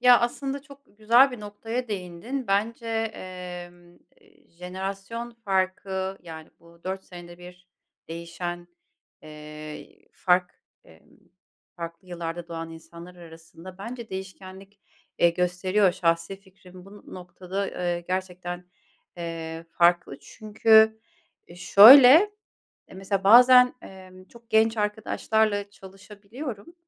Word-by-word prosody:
Ya, 245 Hz, -1 st, +6 dB
aslında 270 Hz, +3 st, -3 dB
çok 280 Hz, -1 st, -16 dB, 0.2 s
güzel 240 Hz, +5 st, +5 dB
bir 245 Hz, -4 st, -9 dB
noktaya 225 Hz, +4 st, -6 dB
değindin. 205 Hz, +7 st, -5 dB
Bence, 220 Hz, +4 st, -1 dB, 0.3 s
eee, 180 Hz, -1 st, -9 dB, 0.8 s
jenerasyon 195 Hz, +6 st, -7 dB
farkı, 190 Hz, 0 st, -2 dB
yani, 160 Hz, -2 st, -11 dB
bu 170 Hz, 0 st, -21 dB
4 190 Hz, 0 st, -5 dB
senede 175 Hz, -1 st, -12 dB
bir 180 Hz, 0 st, -14 dB, 0.4 s
değişen, 175 Hz, +1 st, -7 dB, 0.5 s
eee, 150 Hz, 0 st, -11 dB
fark 180 Hz, -1 st, +1 dB, 0.3 s
eee, -, -, -20 dB, 0.7 s
farklı 170 Hz, +1 st, -9 dB
yıllarda 170 Hz, 0 st, -6 dB
doğan 165 Hz, 0 st, -6 dB
insanlar 170 Hz, +2 st, -13 dB
arasında 165 Hz, +2 st, -14 dB
bence 235 Hz, +2 st, -8 dB
değişkenlik, 190 Hz, +1 st, -10 dB, 0.4 s
eee, 170 Hz, -, +4 dB
gösteriyor. 180 Hz, +2 st, +1 dB
Şahsi 165 Hz, +2 st, -1 dB
fikrim 185 Hz, -2 st, -17 dB
bu 205 Hz, +1 st, -14 dB
noktada, 185 Hz, +2 st, -6 dB
eee, 175 Hz, -1 st, -3 dB
gerçekten, 180 Hz, -1 st, -5 dB, 0.5 s
eee, 165 Hz, -1 st, -6 dB
farklı. 175 Hz, -5 st, +2 dB
Çünkü 220 Hz, +4 st, +3 dB, 0.6 s
şöyle, 245 Hz, +9 st, +9 dB, 0.8 s
eee, -, -, -15 dB
mesela 195 Hz, 0 st, -3 dB
bazen, 250 Hz, +3 st, +7 dB
eee, 185 Hz, -1 st, -13 dB, 0.2 s
çok 235 Hz, 0 st, -18 dB
genç 220 Hz, +1 st, +3 dB
arkadaşlarla 210 Hz, -1 st, -1 dB
çalışabiliyorum. 205 Hz, -, -10 dB
190 Hz, 105 wpm, -25 LUFS, 175-215 Hz, 0.8 s, şöyle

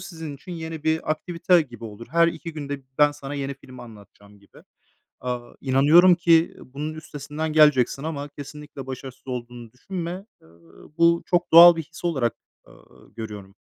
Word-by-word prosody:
sizin 160 Hz, -5 st, -8 dB
için 180 Hz, +6 st, -11 dB
yeni 160 Hz, -2 st, -7 dB
bir 160 Hz, 0 st, 0 dB
aktivite 170 Hz, +2 st, +2 dB
gibi 120 Hz, -5 st, -12 dB
olur. 110 Hz, +1 st, -9 dB
Her 170 Hz, +1 st, +4 dB
2 165 Hz, 0 st, -7 dB
günde 145 Hz, -2 st, -5 dB
b -, -, -32 dB
ben 145 Hz, 0 st, +5 dB
sana 145 Hz, -1 st, -8 dB
yeni 140 Hz, -1 st, -4 dB
filmi 130 Hz, -2 st, -13 dB
anlatacağım 105 Hz, -2 st, -16 dB
gibi. 100 Hz, -, -20 dB, 0.6 s
Aaa, 125 Hz, -1 st, -5 dB
inanıyorum 150 Hz, +7 st, +5 dB
ki, 170 Hz, -1 st, +3 dB
ııı, 130 Hz, -, -17 dB
bunun 155 Hz, +2 st, -4 dB
üstesinden 155 Hz, 0 st, -6 dB
geleceksin 150 Hz, -4 st, +4 dB
ama 145 Hz, -2 st, -4 dB
kesinlikle 145 Hz, -1 st, -10 dB
başarısız 130 Hz, 0 st, -9 dB
olduğunu 120 Hz, -2 st, -7 dB
düşünme. 180 Hz, +6 st, -6 dB, 0.2 s
Iıı, 85 Hz, 0 st, -19 dB
bu 170 Hz, 0 st, +4 dB
çok 175 Hz, -1 st, 0 dB
doğal 170 Hz, +1 st, +10 dB
bir 165 Hz, -, -3 dB
his 155 Hz, -, -15 dB
olarak, 135 Hz, -9 st, 0 dB, 0.3 s
ııı, -, -, -20 dB
görüyorum. 105 Hz, -3 st, -8 dB
145 Hz, 165 wpm, -24 LUFS, 125-165 Hz, 0.6 s, doğal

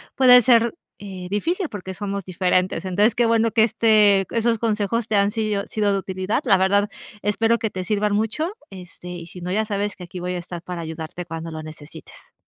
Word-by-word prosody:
puede 250 Hz, -1 st, +7 dB
ser, 235 Hz, +1 st, +4 dB, 0.2 s
eh, 190 Hz, -3 st, -8 dB
difícil, 335 Hz, -, -1 dB
porque 190 Hz, -2 st, -7 dB
somos 200 Hz, 0 st, -4 dB
diferentes. 185 Hz, +1 st, 0 dB
Entonces, 205 Hz, +5 st, +2 dB
qué 240 Hz, -, +3 dB
bueno 230 Hz, 0 st, +3 dB
que 220 Hz, -, +4 dB
este 210 Hz, -4 st, +4 dB
esos 230 Hz, -1 st, +1 dB
consejos 220 Hz, 0 st, -1 dB
te 220 Hz, -, 0 dB
han 200 Hz, 0 st, +3 dB
sido 210 Hz, -2 st, -1 dB
sido 210 Hz, -3 st, 0 dB
de 195 Hz, -, +1 dB
utilidad. 190 Hz, +1 st, -2 dB
La 195 Hz, -, +5 dB
verdad, 200 Hz, +2 st, +2 dB, 0.4 s
espero 225 Hz, +3 st, +2 dB
que 220 Hz, -2 st, -3 dB
te 185 Hz, -, -4 dB
sirvan 210 Hz, +2 st, 0 dB
mucho, 225 Hz, -, -1 dB, 0.2 s
este, 180 Hz, -2 st, -11 dB
y 175 Hz, -1 st, -7 dB
si 180 Hz, +1 st, -11 dB
no, 180 Hz, +1 st, -4 dB
ya 215 Hz, +3 st, +1 dB
sabes 205 Hz, -1 st, -2 dB
que 180 Hz, -, -10 dB
aquí 180 Hz, +1 st, -8 dB
voy 180 Hz, +1 st, -3 dB
a -, -, -2 dB
estar 175 Hz, -1 st, -7 dB
para 175 Hz, -1 st, -6 dB
ayudarte 160 Hz, +2 st, -6 dB
cuando 165 Hz, 0 st, -6 dB
lo 155 Hz, -1 st, -7 dB
necesites. 155 Hz, -1 st, -12 dB
200 Hz, 205 wpm, -22 LUFS, 180-220 Hz, 0.4 s, puede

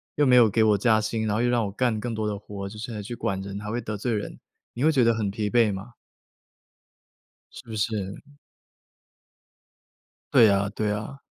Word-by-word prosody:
又 145 Hz, -, +3 dB
没 130 Hz, -2 st, +5 dB
有 120 Hz, -3 st, +7 dB
给 110 Hz, +3 st, +1 dB
我 105 Hz, -2 st, +4 dB
加 110 Hz, +2 st, +3 dB
薪， 110 Hz, +1 st, -2 dB
然 105 Hz, -, 0 dB
后 110 Hz, -, +1 dB
又 120 Hz, -, +2 dB
让 120 Hz, -2 st, +1 dB
我 100 Hz, -, -4 dB
干 115 Hz, +1 st, 0 dB
更 120 Hz, +2 st, -4 dB
多 110 Hz, -1 st, -2 dB
的 105 Hz, -1 st, -2 dB
活， 100 Hz, -1 st, -7 dB
就 105 Hz, +2 st, -10 dB
是 120 Hz, +3 st, -6 dB
还 110 Hz, -, -5 dB
要 -, -, -4 dB
去 110 Hz, +4 st, -6 dB
管 95 Hz, -4 st, -2 dB
人， 100 Hz, 0 st, -6 dB
还 105 Hz, 0 st, -5 dB
会 120 Hz, -, -1 dB
得 105 Hz, -3 st, -5 dB
罪 115 Hz, +4 st, -2 dB
人。” 105 Hz, -1 st, -4 dB, 0.4 s
你 125 Hz, -, -1 dB
会 160 Hz, -, +5 dB
觉 130 Hz, -6 st, +3 dB
得 115 Hz, -, +4 dB
很 105 Hz, -3 st, -1 dB
疲 105 Hz, 0 st, -2 dB
惫 115 Hz, -1 st, +3 dB
吗？ 100 Hz, +5 st, -7 dB, 1.6 s
是 -, -, -11 dB
不 110 Hz, -, -7 dB
是？ 110 Hz, +1 st, 0 dB, 0.3 s
嗯。 145 Hz, 0 st, -21 dB, 2.0 s
对 110 Hz, -, +7 dB
啊， 100 Hz, 0 st, +2 dB
对 105 Hz, -1 st, 0 dB
啊。 105 Hz, +6 st, -5 dB
110 Hz, 240 characters per minute, -25 LUFS, 105-120 Hz, 2.0 s, 有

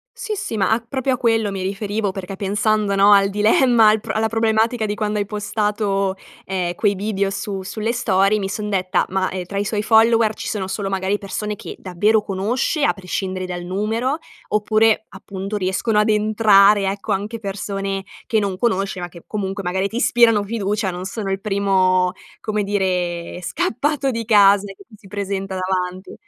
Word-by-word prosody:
Sì, 450 Hz, -3 st, -4 dB
sì. 300 Hz, -, -4 dB
Ma 195 Hz, -, +2 dB
a 220 Hz, -, +3 dB
proprio 260 Hz, +1 st, -1 dB
a -, -, -1 dB
quello 225 Hz, -4 st, +1 dB
mi 195 Hz, -1 st, -4 dB
riferivo, 200 Hz, +1 st, -2 dB
perché 195 Hz, 0 st, -6 dB
pensando 205 Hz, +1 st, 0 dB
no, 200 Hz, +1 st, +5 dB
al 195 Hz, 0 st, +5 dB
dilemma 220 Hz, +2 st, +4 dB
al 215 Hz, 0 st, +3 dB
p -, -, -9 dB
alla 220 Hz, +1 st, 0 dB
problematica 225 Hz, +1 st, +1 dB
di 205 Hz, 0 st, -1 dB
quando 210 Hz, 0 st, -2 dB
hai 205 Hz, -, 0 dB
postato, 205 Hz, -2 st, -1 dB, 0.3 s
ehm, 180 Hz, -2 st, -2 dB
quei 205 Hz, 0 st, +1 dB
video 200 Hz, 0 st, -1 dB
su 195 Hz, -1 st, -4 dB
sulle 215 Hz, +4 st, -3 dB
story 195 Hz, -2 st, +2 dB
mi 195 Hz, -1 st, -3 dB
son 210 Hz, +1 st, -4 dB
detta: 185 Hz, -2 st, 0 dB
"Ma, 190 Hz, 0 st, -1 dB
ehm, 185 Hz, -1 st, -4 dB
tra 200 Hz, -, -7 dB
i 200 Hz, -, 0 dB
suoi 210 Hz, 0 st, -1 dB
followers 225 Hz, 0 st, +4 dB
ci -, -, -5 dB
sono 195 Hz, -4 st, -3 dB
solo 195 Hz, 0 st, -3 dB
magari 190 Hz, +1 st, 0 dB
persone 210 Hz, +1 st, -4 dB
che -, -, -9 dB
davvero 205 Hz, +4 st, +1 dB
conosce, 225 Hz, -, -1 dB
a -, -, +4 dB
prescindere 185 Hz, -1 st, -4 dB
dal 175 Hz, -1 st, -5 dB
numero, 220 Hz, -, -1 dB, 0.3 s
oppure, 215 Hz, +1 st, +2 dB
appunto, 195 Hz, +1 st, -6 dB
riescono 205 Hz, +3 st, 0 dB
ad 210 Hz, +1 st, +3 dB
entrare, 210 Hz, -1 st, +5 dB
ecco, 200 Hz, 0 st, -3 dB
anche 210 Hz, +4 st, -3 dB
persone 195 Hz, -1 st, -4 dB, 0.2 s
che 220 Hz, -, +1 dB
non 195 Hz, -3 st, -1 dB
conosce, 195 Hz, -5 st, 0 dB
ma 175 Hz, -, -4 dB
che 170 Hz, 0 st, -14 dB
comunque 195 Hz, -1 st, -3 dB
magari 190 Hz, +2 st, -1 dB
ti 225 Hz, -, -7 dB
ispirano 230 Hz, -4 st, +4 dB
fiducia, 205 Hz, -2 st, -1 dB
non 180 Hz, 0 st, -6 dB
sono 195 Hz, -1 st, -4 dB
il 195 Hz, -, -2 dB
primo, 190 Hz, -3 st, +2 dB, 0.3 s
come 210 Hz, -1 st, -1 dB
dire, 180 Hz, -4 st, -2 dB
scappato 275 Hz, -, -1 dB
di 230 Hz, -2 st, -4 dB
casa 205 Hz, -2 st, +5 dB
che 205 Hz, -, -12 dB
ti 220 Hz, -, -19 dB
si 195 Hz, -, -16 dB
presenta 195 Hz, -1 st, -4 dB
davanti. 185 Hz, 0 st, -3 dB
205 Hz, 185 wpm, -20 LUFS, 190-220 Hz, 0.3 s, no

